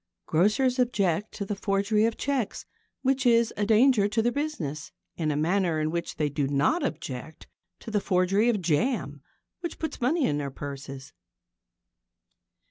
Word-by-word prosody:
Grocers 215 +10 +2
object 210 -5 +1
to 200 - -4
the 205 - -2
forgery 200 +2 +1
of 230 0 -1
cheques, 270 -6 -2 0.4
which 270 0 +2
is 235 -2 +4
a 205 0 -1
danger 220 -1 +5
to 215 +2 0
their 240 - +2
business, 190 - -4 0.2
in 160 -3 -1
a 150 - 0
manner 170 +1 +1
in 155 0 0
which 170 0 -3
they 150 - 0
do 145 -1 -1
not 145 - +2
object 160 - -5 0.4
to 225 - -8
the 210 -2 +1
forgery 195 +5 +2
of 210 -6 0
jam, 155 - 0 0.4
which 345 -1 -5
puts 320 - -5
money 285 +5 +2
in 145 - 0
their 140 -1 -3
purses. 135 -1 -8
200 Hz, 160 wpm, -27 LUFS, 155-240 Hz, 0.4 s, danger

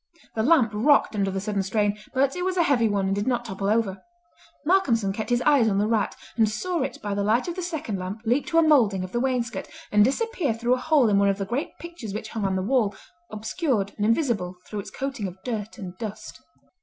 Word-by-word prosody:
The 220 - -1
lamp 255 -3 +4
rocked 240 +4 +3
under 200 -2 0
the 195 0 -2
sudden 205 0 -1
strain, 205 +1 0 0.2
but 275 +1 +1
it 360 - -3
was 370 0 -1
a 345 - +5
heavy 245 -8 +3
one 200 -1 0
and 190 - +1
did 205 +3 -2
not 240 -2 0
topple 195 -2 -3
over. 210 -3 0 0.6
Malcolmson 240 - +2
kept 215 +3 -4
his 245 0 +2
eyes 280 -7 +4
on 195 - 0
the 205 - +2
rat, 220 -1 0 0.2
and 220 -2 +3
saw 345 +10 -2
it 265 - -3
by 205 -1 -2
the 200 - -1
light 220 - +2
of 345 - -2
the 370 - -4
second 315 - -3
lamp 185 +4 -5
leap 245 +6 +1
to 330 - 0
a 330 - +7
moulding 230 -12 +4
of 185 - -6
the 240 - -1
wainscot 250 -2 -1 0.2
and 210 0 +6
disappear 305 - 0
through 240 +2 +1
a - - +2
hole 300 -5 +4
in 200 -2 +3
one 200 0 +4
of 195 - 0
the 195 - -3
great 245 +9 -3
pictures 335 -12 -7
which 220 0 -5
hung 220 -3 -3
on 190 -1 0
the 185 - -1
wall, 215 -3 +1 0.3
obscured 215 - -1
and 205 - -2
invisible 225 - +1
through 210 - -5
its 200 - -7
coating 265 -7 -4
of 180 0 -9
dirt 220 -3 -4
and 185 -5 -7
dust. 215 - -7
225 Hz, 245 wpm, -25 LUFS, 200-270 Hz, 0.6 s, a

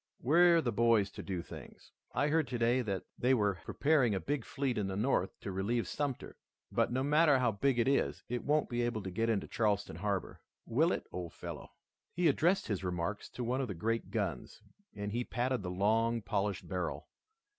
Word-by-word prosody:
"We're 170 +4 +5
the 120 - -1
boys 115 -3 +3
to - - -8
do 90 -3 -4
things. - - -12 0.2
I 145 - +1
heard 155 -1 +2
today 120 +1 +2
that 100 -6 -3 0.2
they 130 +2 +4
were 100 -5 +1
preparing 135 -8 +2
a - - 0
big 145 +7 -2
fleet 135 -5 -1
in 100 - -1
the 95 - -3
North 115 +7 0
to 100 - -4
relieve 105 +5 -1
Sumter, 145 -4 -3 0.3
but - - +1
no 130 +2 0
matter 150 0 +5
how 125 -3 +2
big 120 +5 +1
it 120 - +2
is, 140 0 +1
it 125 0 -3
won't 150 0 +2
be 120 0 -1
able 120 -3 -1
to 95 - -5
get 115 +5 0
into 105 -3 0
Charleston 105 -3 0
harbor. 100 -3 -3 0.2
Will 155 +9 +2
it, - - -2
old 85 -3 -5
fellow?" - - -8 0.5
He 175 -1 +3
addressed 170 +6 +3
his 100 -4 -2
remarks 90 +3 -3
to 125 - -5
one 125 +3 0
of 130 - -2
the 100 - -5
great 115 +6 -1
guns, 95 - -3 0.3
and 105 0 -4
he 120 +3 -1
patted 125 0 -1
the 90 - -4
long, 110 +5 +1
polished 100 -1 -1
barrel. 90 -2 -3
115 Hz, 200 wpm, -33 LUFS, 100-135 Hz, 0.5 s, We're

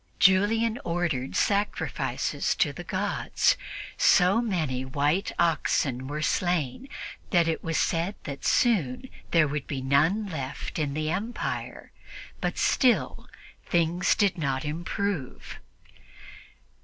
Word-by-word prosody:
Julian 220 +5 +3
ordered 170 -7 -2
sacrifices 205 0 0
to - - +1
the - - -7
gods. - - +1 0.4
So 190 +5 +5
many 160 - -1
white 145 +8 0
oxen 135 -5 +1
were 150 +2 -3
slain 175 - 0 0.4
that 170 -4 +3
it 165 - -1
was 165 -1 -1
said 170 +5 0
that 140 -1 -7
soon 210 - +1 0.2
there 165 -3 +4
would 145 0 -4
be 140 - -3
none 155 +11 +2
left 150 -5 -5
in 145 -2 -1
the 155 0 -1
empire; 215 +7 -4 0.5
but - - -2
still 220 - +2 0.4
things 170 +2 +2
did 200 -4 +1
not 135 -2 -1
improve. 170 0 -4
165 Hz, 115 wpm, -27 LUFS, 140-195 Hz, 0.5 s, So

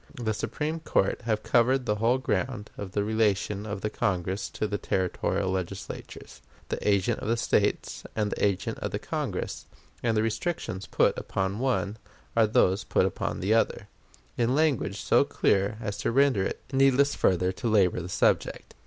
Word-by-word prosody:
The 110 -2 0
Supreme 155 +9 -3
Court 100 -10 0
have 110 -2 0
covered 125 +2 +3
the 105 -2 0
whole 115 +4 +3
ground 115 -2 -2
of 95 -2 -7
the 100 - +1
relation 105 -1 0
of 105 -1 -4
the 105 - -2
Congress 95 0 -1
to - - -3
the 105 -1 -2
Territorial 95 +1 -1
Legislatures 95 -7 -6 0.3
the - - -2
agent 100 -2 +2
of - - -5
the 115 +1 +1
States - - 0
and 105 -2 0
the - - -3
agent 100 -3 0
of - - -3
the - - -2
Congress - - -4 0.3
and 115 -2 +1
the 110 - +3
restrictions 110 - -3
put - - +2
upon 95 -1 -2
the 100 - -5
one 120 -5 0 0.4
are 115 -2 +5
those 95 -1 +3
put - - +2
upon - - -2
the 100 +4 +2
other, 115 - +1 0.5
in 120 +2 +2
language 135 -10 +1
so - - +4
clear 100 +2 +1
as 105 -3 -4
to - - 0
render 135 -4 +3
it 95 - -3
needless 135 +1 +4
further 90 0 +2
to 105 +6 -4
labor 95 -5 +3
the 90 - -7
subject. - - 0
105 Hz, 180 wpm, -27 LUFS, 95-120 Hz, 0.5 s, are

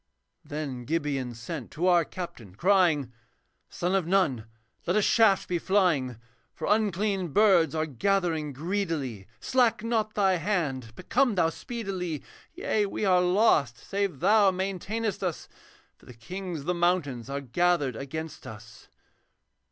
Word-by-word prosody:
Then 140 -5 -5
Gibeon 140 -5 -2
sent 120 +3 -6
to 170 - -2
our 175 -2 +5
captain, 120 - -8
crying, 165 - +2 0.6
'Son 175 +2 -2
of 190 -4 +1
Nun, 150 - +1 0.4
let 175 - +2
a 215 - +4
shaft 215 -4 +4
be 175 -1 -1
flying, 165 - +1 0.4
For - - -5
unclean 205 -2 +1
birds 185 -7 +4
are 155 0 0
gathering 160 - 0
greedily; 150 - -3
Slack 235 -4 +2
not 220 -2 -1
thy 195 -3 +3
hand, 155 - -2
but - - -13
come 255 -6 +3
thou 165 -3 +2
speedily. 190 - -5 0.3
Yea, 210 -2 0
we 205 - -3
are 180 -2 +4
lost 180 - +3
save 195 - -3
thou 210 -2 +5
maintain'st 195 +3 -3
us, 180 -4 -3 0.5
For - - -22
the 125 - -12
kings 180 +5 -6
of - - -12
the 180 - +1
mountains 170 -9 0
are 140 0 -2
gathered 145 0 +1
against 160 +5 -6
us.' 110 0 -12
175 Hz, 145 wpm, -27 LUFS, 140-195 Hz, 0.6 s, our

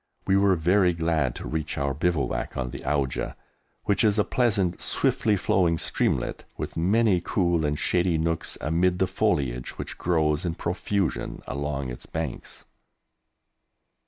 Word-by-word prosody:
We 95 - +3
were 100 -1 +4
very 90 +2 +3
glad 80 -6 0
to - - -6
reach 80 +4 -3
our 70 -1 0
bivouac 80 0 -1
on 65 -2 -2
the - - -6
Auja, 70 -3 -1 0.5
which 100 - +2
is 105 -1 +3
a 105 - +4
pleasant, 100 -9 +1
swiftly 105 -2 +1
flowing 90 -3 +2
streamlet, - - -1
with - - -5
many 95 +2 +3
cool 85 -4 +1
and 75 0 -1
shady 90 0 +2
nooks 80 0 -1
amid 90 +4 +2
the 95 - +3
foliage 60 -8 -1
which - - -6
grows 80 -3 +1
in 85 -2 -2
profusion 90 +1 -2
along 70 -2 -3
its - - -9
banks. 80 -6 -5
85 Hz, 145 wpm, -26 LUFS, 75-95 Hz, 0.5 s, were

